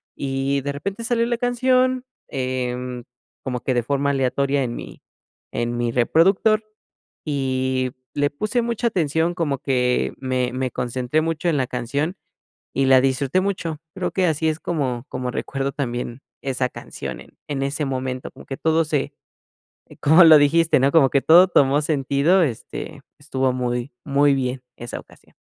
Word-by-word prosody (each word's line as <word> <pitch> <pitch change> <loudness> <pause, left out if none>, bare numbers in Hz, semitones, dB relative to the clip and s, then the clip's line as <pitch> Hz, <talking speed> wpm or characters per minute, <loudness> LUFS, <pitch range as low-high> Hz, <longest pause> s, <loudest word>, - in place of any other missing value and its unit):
Y, 135 0 -1
de 140 +1 -3
repente, 195 +10 -5
salió 230 0 +1
la 240 0 -1
canción, 255 +1 +2 0.2
em, 125 -1 -3 0.4
como 125 -2 -3
que 130 - 0
de 120 - +2
forma 140 +3 0
aleatoria 135 +1 +1
en 120 -2 -3
mi - - -9 0.5
en 120 0 -2
mi 120 -1 0
reproductor 190 - +3 0.6
y 130 -3 -1 0.2
le 145 0 +2
puse 215 +11 -1
mucha 235 0 -2
atención, 165 -3 0
como 155 -6 -1
que 125 -2 +1
me 130 -2 -1
me 130 0 -1
concentré 125 +5 -1
mucho 165 +2 -1
en 155 - +1
la 130 - +1
canción 140 +9 -2 0.6
y 135 - +1
la 130 -1 +7
disfruté 135 +5 +1
mucho. 180 -5 -3 0.2
Creo - - -2
que 185 -2 +1
así 160 0 +1
es 155 +1 -3
como 135 -7 -2
como 125 -1 -3
recuerdo 135 +2 -3
también 120 -2 -4 0.2
esa 130 -1 -1
canción - - -7
en - - -17
en 140 -2 -2
ese 140 +2 -2
momento, 130 -1 -3
como - - -14
que 135 - -6
todo 160 0 +2
se 150 -3 -1 0.9
como 160 +5 +7
lo 155 -1 +9
dijiste, 165 +2 +4
¿no?, 135 +2 +3
como 140 -5 +6
que 140 - +2
todo 175 +3 +7
tomó 140 -3 +4
sentido, 145 +4 +2
este, 125 -8 -5 0.2
estuvo 135 -3 0
muy 125 0 -2
muy 140 0 +3
bien 130 -1 -2
esa 120 0 -6
ocasión. - - -19
140 Hz, 165 wpm, -22 LUFS, 130-160 Hz, 0.9 s, lo